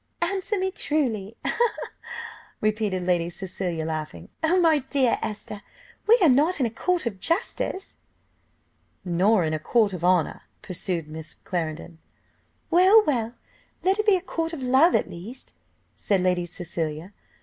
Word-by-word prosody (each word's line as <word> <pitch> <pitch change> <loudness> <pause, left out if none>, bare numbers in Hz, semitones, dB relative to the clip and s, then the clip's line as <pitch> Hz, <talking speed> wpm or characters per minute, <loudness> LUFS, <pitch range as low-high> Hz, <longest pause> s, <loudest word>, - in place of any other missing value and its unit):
"Answer 395 +2 -1
me 380 0 0
truly!" 230 - -1 1.2
repeated 215 -3 0
Lady 175 -1 +1
Cecilia, 175 -2 -4
laughing. 155 - -5
"Oh, 340 +4 +3
my 325 -3 +4
dear 265 -2 +1
Esther, 210 -1 -5 0.5
we 460 +2 +7
are - - +7
not 300 +6 +3
in 260 - +3
a 230 - -1
court 355 +7 0
of 205 -5 -3
justice." 360 - -2 1.1
"Nor 185 +3 +3
in 155 -1 -1
a 155 - -1
court 210 +4 +2
of 175 -2 -6
honour," 180 -3 +2 0.2
pursued 175 -3 -3
Miss 155 +1 -7
Clarendon. 165 -1 -4 0.7
"Well, 380 +6 +7
well! 235 -5 0 0.5
let 385 +3 +2
it 425 - 0
be 410 - +7
a 365 - -1
court 330 -2 -3
of 280 -5 -5
love 265 +7 +5
at - - +2
least," 210 +10 -9 0.4
said 195 -3 0
Lady 180 -1 +1
Cecilia. 170 0 -5
215 Hz, 145 wpm, -25 LUFS, -, 1.2 s, we